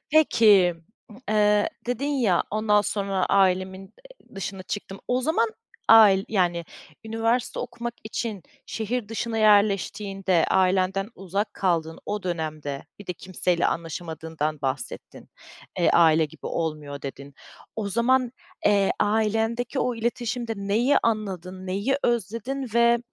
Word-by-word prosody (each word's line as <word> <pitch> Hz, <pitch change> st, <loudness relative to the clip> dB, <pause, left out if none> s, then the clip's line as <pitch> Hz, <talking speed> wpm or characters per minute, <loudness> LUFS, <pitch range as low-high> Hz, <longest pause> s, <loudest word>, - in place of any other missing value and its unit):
Peki, 210 Hz, -, +5 dB, 0.3 s
m 215 Hz, -, -14 dB
eee, 210 Hz, -1 st, +3 dB, 0.2 s
dedin 245 Hz, +3 st, -2 dB
ya, 240 Hz, -12 st, +2 dB
"Ondan 210 Hz, 0 st, +3 dB
sonra 195 Hz, -2 st, -1 dB
ailemin, 190 Hz, -1 st, +2 dB
eee, -, -, -19 dB
dışına 195 Hz, 0 st, -5 dB
çıktım." 195 Hz, +1 st, -6 dB
O 250 Hz, +1 st, +1 dB
zaman 395 Hz, -, +1 dB, 0.4 s
ail 205 Hz, -4 st, +7 dB
yani, 175 Hz, -5 st, +1 dB, 0.4 s
üniversite 225 Hz, +2 st, -1 dB
okumak 240 Hz, -1 st, -5 dB
için 220 Hz, -3 st, -4 dB, 0.2 s
şehir 225 Hz, 0 st, -3 dB
dışına 225 Hz, 0 st, -3 dB
yerleştiğinde, 200 Hz, -3 st, +2 dB
ailenden 190 Hz, +1 st, +2 dB
uzak 195 Hz, +3 st, -3 dB
kaldığın 165 Hz, -4 st, -1 dB
o 210 Hz, -1 st, -3 dB
dönemde, 155 Hz, -5 st, -4 dB
bir 205 Hz, -, -12 dB
de 180 Hz, -, -2 dB
kimseyle 180 Hz, -1 st, -1 dB
anlaşamadığından 160 Hz, -2 st, -4 dB
bahsettin. 135 Hz, -1 st, -5 dB, 0.5 s
Eee, 175 Hz, -, +4 dB
"Aile 160 Hz, -1 st, +5 dB
gibi 150 Hz, -, -9 dB
olmuyor." 150 Hz, -3 st, -4 dB
dedin. 140 Hz, 0 st, -8 dB, 0.4 s
O 210 Hz, -2 st, -2 dB
zaman, 240 Hz, +4 st, +2 dB, 0.3 s
eee, 200 Hz, -1 st, +3 dB
ailendeki 225 Hz, +4 st, 0 dB
o 250 Hz, 0 st, 0 dB
iletişimde 235 Hz, 0 st, -2 dB
neyi 215 Hz, +8 st, +2 dB
anladın, 190 Hz, -4 st, -2 dB
neyi 200 Hz, +9 st, 0 dB
özledin? 235 Hz, +4 st, -1 dB
Ve, 235 Hz, 0 st, +5 dB
200 Hz, 120 wpm, -25 LUFS, 180-230 Hz, 0.5 s, ail